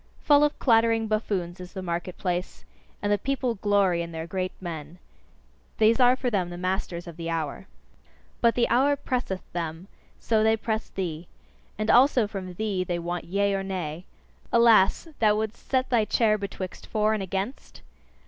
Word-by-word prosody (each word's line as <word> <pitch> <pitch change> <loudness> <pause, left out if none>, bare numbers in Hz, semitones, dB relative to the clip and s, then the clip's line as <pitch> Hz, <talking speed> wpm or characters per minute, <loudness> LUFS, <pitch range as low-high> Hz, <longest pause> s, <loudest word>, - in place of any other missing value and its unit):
Full 290 0 +5
of 295 - +1
clattering 225 -2 +3
buffoons 195 -5 -2
is 180 0 -10
the 190 - -5
market 175 0 -4
place, 180 -1 -3 0.4
and 205 - +1
the 205 - +2
people 265 -3 -1
glory 200 -4 +2
in 170 0 -5
their 160 0 -5
great 185 +1 -3
men! 165 -2 -7 0.8
These 225 +3 +4
are 250 0 +6
for 255 -1 -2
them 185 -5 0
the 175 - -7
masters 180 -1 -2
of 170 -2 -10
the 165 -1 -4
hour. 165 +3 -3 0.7
But 235 -1 +4
the 240 - +2
hour 280 +4 +3
presseth 245 -9 -3
them; 165 +1 -4 0.3
so 220 -2 +1
they 220 0 +3
press 220 0 -3
thee. 170 -3 -4 0.5
And 215 +1 +1
also 250 -2 +5
from 190 -3 -6
thee 200 -2 -1
they 175 -1 -2
want 175 +1 -4
Yea 200 +2 +1
or 195 - 0
Nay. 180 -3 -4 0.5
Alas! 230 - +5
thou 210 -2 +4
wouldst 220 +1 -4
set 260 -1 +1
thy 235 -3 +4
chair 215 -1 +3
betwixt 195 -3 -6
For 215 0 +1
and 215 - -1
Against? 195 +7 -5
195 Hz, 175 wpm, -26 LUFS, 175-225 Hz, 0.8 s, are